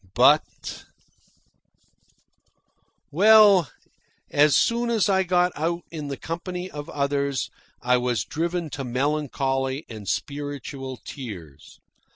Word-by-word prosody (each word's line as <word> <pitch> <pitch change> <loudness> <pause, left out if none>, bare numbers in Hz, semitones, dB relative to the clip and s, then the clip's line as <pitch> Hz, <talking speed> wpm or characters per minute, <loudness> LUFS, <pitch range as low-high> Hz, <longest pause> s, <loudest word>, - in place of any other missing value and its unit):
But - - +2 2.3
Well, 200 -2 +6 0.6
as 145 0 +4
soon 235 +1 +2
as 225 -4 +2
I 190 -1 +3
got 180 -1 +2
out 170 +3 -2
in 155 -3 -6
the 140 -1 -4
company 180 +2 -5
of 145 0 -7
others 140 -1 -1 0.3
I 125 0 +3
was 125 -4 -1
driven 170 0 -2
to 135 - -4
melancholy 135 +1 -1
and 110 -3 -9
spiritual 140 -2 -4
tears. 90 - -9
145 Hz, 105 wpm, -24 LUFS, 135-175 Hz, 2.3 s, Well